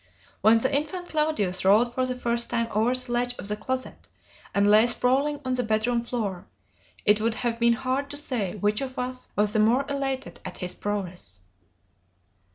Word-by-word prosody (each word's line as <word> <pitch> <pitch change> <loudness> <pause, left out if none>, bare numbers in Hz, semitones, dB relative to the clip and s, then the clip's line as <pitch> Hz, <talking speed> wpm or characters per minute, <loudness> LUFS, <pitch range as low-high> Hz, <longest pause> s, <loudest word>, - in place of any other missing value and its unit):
When 220 +3 +6
the 260 +4 0
infant 330 +5 -2
Claudius 300 - 0
rolled 215 +5 +4
for 255 0 0
the 255 - -2
first 235 -1 -1
time 230 -1 0
over 225 +4 +2
the 255 -1 -1
ledge 245 0 0
of 195 - -4
the 210 - -1
closet 255 +5 -5 0.4
and 200 0 +2
lay 215 +3 +6
sprawling 270 +5 +2
on 255 - 0
the 250 - 0
bedroom 225 +1 +1
floor, 210 -7 -4 0.6
it 210 +1 +4
would 225 0 0
have 230 -1 -2
been 235 0 +4
hard 265 +3 -2
to 290 - -5
say 235 -10 -3
which 210 +3 0
of 260 -1 -5
us 255 0 -4
was 210 0 +1
the 215 - +2
more 235 +6 +3
elated 275 -1 -3
at - - -7
his 180 0 -3
prowess." 180 - -5
235 Hz, 185 wpm, -26 LUFS, 210-255 Hz, 0.6 s, When